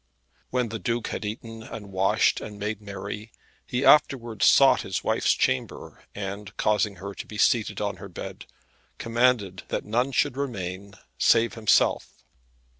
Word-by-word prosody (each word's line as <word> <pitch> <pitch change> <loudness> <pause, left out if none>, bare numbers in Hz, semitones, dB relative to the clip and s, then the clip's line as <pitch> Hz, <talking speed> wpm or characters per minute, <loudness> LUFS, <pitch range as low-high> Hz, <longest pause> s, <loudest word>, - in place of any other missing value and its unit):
When 125 -2 0
the 110 +1 -5
Duke 120 +1 -2
had - - -4
eaten 115 +1 -6
and 110 -3 -9
washed 95 +1 +2
and 105 -1 -8
made 105 +1 -4
merry, 105 +1 -7 0.4
he 125 +3 -1
afterwards 120 -7 +4
sought - - +6
his - - -4
wife's - - +2
chamber, 65 - -2
and 100 +1 -6
causing 105 -1 +1
her 100 +2 -7
to - - -8
be 105 - -8
seated 110 +1 +2
on 100 -1 -2
her 100 - -9
bed, 85 - -8 0.5
commanded 115 -5 +1
that - - -3
none 120 +5 0
should 130 - +1
remain, 100 -7 -5 0.2
save 115 0 +4
himself. 110 -2 +1
105 Hz, 150 wpm, -26 LUFS, 100-115 Hz, 0.5 s, sought